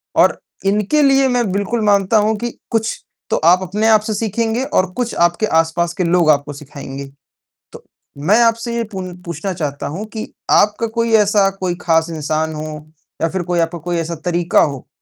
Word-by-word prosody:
और - - +4 0.3
इनके 210 +9 +2
लिए 275 -1 +4
मैं 245 -5 0
बिल्कुल 205 +4 -1
मानता 200 +1 +3
हूँ 220 +1 +1
कि 240 +3 -3 0.2
कुछ 225 -1 -1 0.3
तो - - +1
आप 180 - +5
अपने 210 +5 -1
आप 215 -1 +5
से 215 0 -3
सीखेंगे 225 +3 -1
और 185 -7 0
कुछ 245 +1 -2
आपके 175 +5 0 0.2
आसपास 170 +1 -2
के 185 - +1
लोग 170 -1 +3
आपको 145 -1 +2
सिखाएँगे। 140 -1 -8 0.7
तो - - -12 0.4
मैं 215 +5 +5
आपसे 230 +1 +1
ये 235 - 0
पू 190 - -3 0.2
पूछना 170 +3 -4
चाहता 145 -5 -4
हूँ 205 - -4
कि 220 - -5 0.2
आपका 210 +2 +3
कोई 230 0 +1
ऐसा 200 -1 +3
कोई 180 -2 -1
खास 165 0 +2
इंसान 155 0 -2
हो 155 0 -5 0.6
या 165 - +3
फ़िर 185 +2 -3
कोई 175 0 0
आपका 165 +1 -1
कोई 175 +2 -3
ऐसा 165 0 -2
तरीका 175 -1 +2
हो। 140 -4 -2
185 Hz, 190 wpm, -18 LUFS, 165-220 Hz, 0.7 s, आप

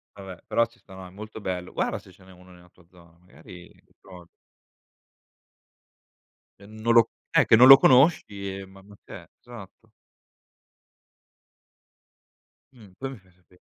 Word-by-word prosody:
Vabbè, 95 -3 -12
però 115 - 0
ci 115 0 -27
sta. 100 - -19
No, 95 -1 -12
è - - -15
molto 110 +3 -12
bello. 90 -2 -6
Guarda - - -3
se 95 - -16
ce 95 +1 -23
n'è 95 - -18
uno 90 0 -19
nella 90 0 -20
tua 90 -1 -26
zona, 85 -1 -23
magari 90 0 -17 0.3
provi. 90 -3 -16 2.3
Non 110 +3 -4
lo 115 -1 +4 0.2
eh, - - +2
che - - +4
non 125 +3 +6
lo 135 0 +10
conosci, 105 - +1
e 95 - -10
ma 95 0 -18
ma 100 +1 -18
che - - -15
è - - -24
esatto. 115 -6 -15 2.8
Mh. 105 -6 -19
Poi 135 0 -7
mi 130 - -11
fai 95 -2 -26
sape 90 0 -29
95 Hz, 155 wpm, -24 LUFS, 90-110 Hz, 2.8 s, lo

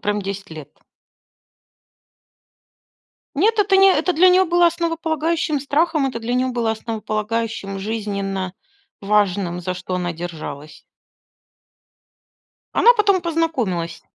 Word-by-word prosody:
Прям 205 0 -1
10 195 -1 -6
лет. 155 -3 -10 2.7
Нет, 430 +8 +2
это 395 -1 +4
не 390 0 +7
это 365 0 +1
для 360 +3 +5
нее 370 +1 +5
было 345 0 +3
основополагающим 330 -2 -1
страхом, 295 +1 +1
это 235 -3 -4
для 240 +2 -2
нее 255 +1 +1
было 235 -3 -1
основополагающим 220 -2 -3
жизненно 200 -3 -3 0.5
важным, 195 -3 0
за 185 +1 -3
что 185 0 -5
она 175 -1 -2
держалась. 155 -3 -8 1.9
Она 485 - +6
потом 400 -4 +3
познакомилась. 250 - -2
225 Hz, 110 wpm, -20 LUFS, -, 2.7 s, не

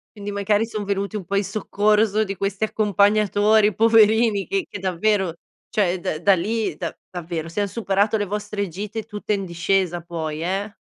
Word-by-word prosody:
Quindi 205 -1 -6
magari 205 +2 +1
son 215 -2 -4
venuti 200 +1 -2
un 200 -4 -4
po' 200 - -3
in 200 - +2
soccorso 210 +1 +1
di 200 -1 -4
questi 195 +2 -2
accompagnatori, 210 0 +3
poverini 220 -1 +4
che 390 -2 -2
che - - -6
davvero, 190 0 0 0.4
cioè 185 -3 +1
da 155 - -3
da 200 +2 +4
lì 205 0 -2
da - - -5
davvero 165 -2 -5
se 205 +5 -2
han 205 - 0
superato 205 0 0
le 205 -1 0
vostre 205 0 -3
gite 205 +5 -5
tutte 210 -1 -3
in 200 -1 -1
discesa 175 0 0
poi, 160 -2 -4
eh. 195 +4 -2
200 Hz, 175 wpm, -22 LUFS, 185-215 Hz, 0.4 s, poverini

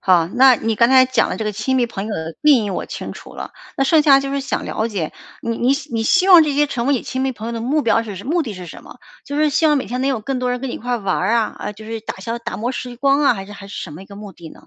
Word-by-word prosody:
好， 175 -3 +3
那 255 +3 +6
你 225 -1 -1
刚 235 +1 +4
才 260 -1 +7
讲 260 - +1
的 - - -3
这 220 - -4
个 215 - -2
亲 220 +6 -1
密 245 -2 +2
朋 210 -3 -6
友 215 - -3
的 160 0 -5
定 280 -7 +5
义 200 - -3
我 - - -3
清 - - -6
楚 - - -12
了， - - -7 0.2
那 270 - +2
剩 310 +2 +4
下 275 -2 +6
就 275 0 -4
是 280 0 -1
想 270 - -3
了 220 - -2
解， 190 -8 -3 0.3
你 230 0 -3
你 250 +3 +2 0.2
你 225 -1 0
希 360 - +3
望 350 -3 +9
这 300 -2 0
些 295 +1 +3
成 245 -3 -3
为 285 - +3
你 250 - -2
亲 260 0 -3
密 265 - 0
朋 225 -2 -8
友 - - -4
的 230 - -4
目 285 +6 +1
标 230 -1 +2
是 200 -2 -8
目 330 +4 +1
的 225 -7 -5
是 180 -1 -9
什 - - -11
么？ - - -13 0.3
就 285 +1 -5
是 305 0 +3
希 315 +3 +2
望 295 -2 +4
每 - - -4
天 250 +1 -3
能 270 - +1
有 240 -5 -1
更 265 +4 -3
多 250 0 -1
人 245 0 -2
跟 270 - -4
你 - - -4
一 - - -6
块 245 +1 -2
玩 195 +1 -1
啊， 230 -2 +1
呃， 210 - -5
就 215 +1 -13
是 225 0 -5
打 220 - -6
消 230 +4 -4
打 235 - -5
磨 240 +4 -2
时 245 -1 -6
光 275 +2 +2
啊， 265 - +4
还 195 -1 -7
是 205 - -11
还 200 -1 -10
是 200 - -7
什 155 - -8
么 170 +6 -10
一 - - -14
个 200 - -12
目 205 -1 -9
的 165 -3 -12
呢？ - - -17
235 Hz, 365 characters per minute, -19 LUFS, 210-270 Hz, 0.3 s, 望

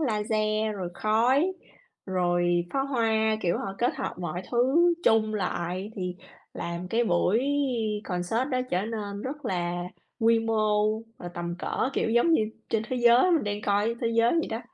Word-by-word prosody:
laser 215 -3 0
rồi 185 -2 -4
khói, 250 - +2 0.5
rồi 175 -1 +1
pháo 270 0 0
hoa, 220 -4 +1
kiểu, 170 -1 0
họ 195 0 -4
kết 245 - +1
hợp - - -3
mọi 175 +1 -4
thứ 275 +9 +3
chung 215 -1 +3
lại 185 +1 -3
thì 180 -1 -3 0.4
làm 170 +1 -5
cái 235 +4 +1
buổi 185 +4 +2 0.6
concert 195 +8 -1
đó 255 -1 +1
trở 180 +1 +1
nên 205 -3 -5
rất 290 +3 -6
là 175 -1 -2 0.4
quy 230 0 +4
mô 215 -1 +1 0.2
và 175 - -6
tầm 170 0 -4
cỡ, 265 - -1
kiểu, 225 - 0
giống 240 +9 +3
như 270 - +4 0.3
trên 220 - 0
thế 255 - -2
giới 240 +8 +5
mình 325 -8 +2
đang 205 0 -2
coi 205 +3 +1
thế 230 - +1
giới 230 +1 +4
vậy 330 -1 +1
đó. 225 +1 -3
215 Hz, 170 wpm, -27 LUFS, 185-235 Hz, 0.6 s, giới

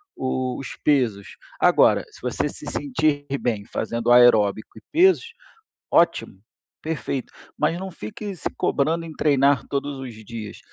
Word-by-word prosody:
o 130 -1 -2
os 135 - -7
pesos. 120 -9 +2 0.3
Agora, - - +4
se - - -16
você - - -1
se - - -11
sentir 145 +1 -1
bem 110 -4 -2
fazendo 115 +1 -2
aeróbico 110 -4 +4
e - - -11
pesos, 365 +4 +3 0.6
ótimo, 170 - +2 0.5
perfeito! 140 -4 -4 0.2
Mas 165 +3 0
não 190 +1 -5
fique 180 - -7
se - - -4
cobrando 160 +4 0
em 160 - -8
treinar 140 -3 +3
todos 140 0 -3
os 130 -3 -7
dias, 110 -2 -8
135 Hz, 140 wpm, -23 LUFS, 115-155 Hz, 0.6 s, Agora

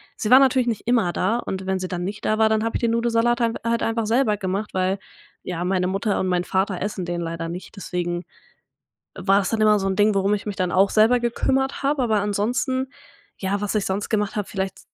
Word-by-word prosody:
sie 215 - -3
war 260 - +10
natürlich 260 -2 +3
nicht 230 -1 -3
immer 225 -8 +2
da 225 +6 +1
und 190 -5 -5
wenn 190 0 +1
sie 185 0 -4
dann 180 -1 -4
nicht 205 +3 -5
da 215 0 +1
war, 220 0 +5
dann 220 0 +1
habe 230 - -1
ich - - -9
den 235 - +2
Nudelsalat 235 +1 +1
hein 230 -1 +2
halt 230 0 0
einfach 225 -1 -1
selber 225 -3 +2
gemacht, 195 +2 -3
weil, 185 +1 0 0.5
ja, 175 -1 -4
meine 185 0 0
Mutter 195 +2 -1
und 185 - 0
mein 180 -1 +1
Vater 190 0 -1
essen 200 -2 -3
den 175 0 -3
leider 165 0 -4
nicht, 180 +5 -8
deswegen 175 -2 -3 1.0
war 195 +1 +3
es 190 - -2
dann 220 -1 -1
immer 210 -1 +5
so 195 - -1
'n 190 - 0
Ding, 210 +1 +3
warum 195 +1 +2
ich 205 - -7
mich 205 - -4
dann 180 -1 0
auch 195 +1 +4
selber 225 +3 +4
gekümmert 265 +3 0
habe, 280 -1 +1
aber 220 -3 +2
ansonsten 245 +6 -1 0.5
ja, 200 +1 -1
was 205 +1 -2
ich 210 - +1
sonst 195 +2 -2
gemacht 210 -2 0
hab, 205 -2 -2
vielleicht 190 -1 -4
205 Hz, 235 wpm, -23 LUFS, 190-230 Hz, 1.0 s, war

